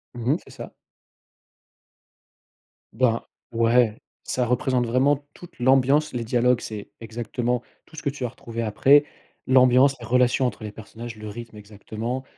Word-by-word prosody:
Mmh 120 +1 -1
mh, - - 0
c'est - - -16
ça. - - -9 2.2
Ben, 115 -3 +2 0.3
ouais, 115 -1 +2 0.2
ça 125 - -1
représente 125 0 +1
vraiment 130 +4 +3 0.2
toute 175 -1 -14
l'ambiance, 135 +4 +3
les 120 -2 -2
dialogues, 120 +1 +2
c'est 105 -2 -7
exactement 120 +2 -3 0.2
tout - - -17
ce 150 - -7
que - - +1
tu 140 -1 -6
vas 125 - -1
retrouver 115 -1 -6
après, 130 +7 +4 0.4
l'ambiance, 130 +1 +5
la 120 - -8
relation 125 +2 +3
entre 110 -2 -6
les 105 - -5
personnages, 110 +2 -9
le 110 0 -9
rythme 115 0 -9
exactement, 110 +4 -6
120 Hz, 150 wpm, -24 LUFS, 115-130 Hz, 2.2 s, l'ambiance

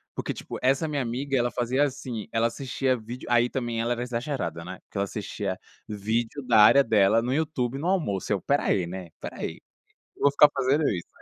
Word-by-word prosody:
Porque - - -3
tipo, - - -7
essa 135 +5 +2
minha 145 -2 -1
amiga, 130 +3 -2
ela 120 0 +1
fazia 125 +3 +1
assim, 125 -6 -4
ela 115 0 +1
assistia 130 +1 -1
vídeo 120 +2 -8
aí 120 0 +4
também 120 -3 -2
ela 120 +1 0
era 120 - -3
exagerada, 120 - -3
né, 95 +1 -7
que - - -7
ela 100 - +1
assistia 100 -2 -4 0.3
vídeo 115 +6 -2
da 115 -3 +5
área 140 +6 +8
dela 110 -2 +4
no 120 +3 -1
YouTube 135 -4 -1
no 165 - -2
almoço, 155 - 0
eu: 105 - +3
"Espera 140 +9 0
aí, 90 - +2
né, 90 0 -6
espera - - -10
aí. - - -4 0.6
Eu - - -11
vou 140 - +6
ficar 145 +1 +7
fazendo 140 +3 +2
isso". 90 -3 -3
120 Hz, 210 wpm, -26 LUFS, 105-135 Hz, 0.6 s, área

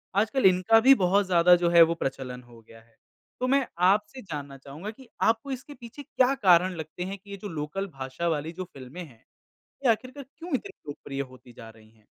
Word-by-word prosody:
आजकल 220 +5 +1
इनका 190 +4 +5
भी 260 +4 +7
बहुत 195 -1 +2
ज़्यादा 180 -1 +5
जो 175 -1 +1
है 170 0 +6
वो 165 0 +6
प्रचलन 130 -4 -5
हो 120 -1 -17
गया 115 0 -17
है। 115 0 -28 0.4
तो 255 - 0
मैं 270 0 +2 0.2
आपसे 210 +7 +1
जानना 145 -6 -7
चाहूँगा 140 +9 -9
कि 255 +3 -17
आपको 225 +5 +1
इसके 265 +3 -7
पीछे 245 +2 -11
क्या 260 0 +2
कारण 185 -6 +4
लगते 160 +2 -6
हैं 195 +2 -5
कि 200 +1 -20
ये 200 - -6
जो 205 - -7
लोकल 160 +5 -4
भाषा 135 +1 -5
वाली 160 0 -1
जो 185 +2 -5
फ़िल्में 135 +7 -9
हैं, 125 -9 -16 0.7
ये - - +5
आखिरकार 255 +5 -4
क्यों 340 0 -7
इतनी 395 +10 -5 0.2
लोकप्रिय 140 -1 -6
होती 130 -2 -12
जा 115 -1 -12
रही 110 -1 -18
हैं? 110 -1 -28
180 Hz, 210 wpm, -26 LUFS, 135-225 Hz, 0.7 s, भी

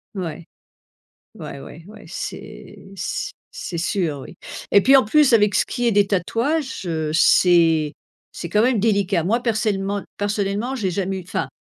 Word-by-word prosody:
Ouais. 170 -3 -5 0.9
Ouais, - - -8
ouais, 165 +4 -12
ouais, 215 0 -13
c'est - - -8
c 190 - -4 0.2
c'est 190 - -6
sûr, 170 -4 -1
oui. 135 - -11 0.4
Et 200 - +6
puis, 270 +5 +6
en 265 - +6
plus, 285 +4 +4
avec 210 -3 +4
ce - - +3
qui 245 - -3
est - - +3
des 205 -1 +3
tatouages, 235 - -1
heu, 160 -3 -2
c'est 165 -2 +4 0.4
c'est - - -6
quand 210 +5 +3
même 240 -1 +2
délicat. 200 -4 +1
Moi, 225 +8 +1
persellement 205 -4 -1
personnellement, 205 +4 -1
j'ai 200 -7 -1
jamais 190 +1 -2
eu - - -10
enfin, 175 - -3
200 Hz, 165 wpm, -21 LUFS, 175-225 Hz, 0.9 s, Et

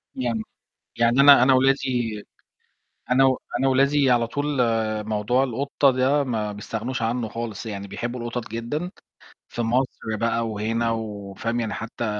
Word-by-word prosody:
يعني 120 -4 -2 0.6
يعني 120 +3 +3
أنا 140 -2 +8
أنا 130 +1 +5
ولادي 130 -5 +1 0.9
أنا 130 +2 +5
و 130 -1 +3 0.2
أنا 135 +2 +2
ولادي 135 +1 +3
على 120 -1 +3
طول، 145 +5 -3 0.6
موضوع 110 +5 +1
القطة 135 +2 +1
ده 130 +3 +2
ما 110 -5 -2
بيستغنوش 115 +5 -4
عنه 115 0 -1
خالص، 115 -1 -6
يعني 100 -2 -6
بيحبوا 120 +4 -5
القطط 120 0 -4
جدًا. 120 +10 -4 0.6
في 120 - -4
مصر 115 -2 -1
بقى 115 +1 0
وهنا 115 +2 -1
و 105 -3 -5
فاهم؟ 115 +4 -2
يعني 110 -3 -3
حتى، 115 +1 -5
120 Hz, 150 wpm, -24 LUFS, 110-130 Hz, 0.9 s, أنا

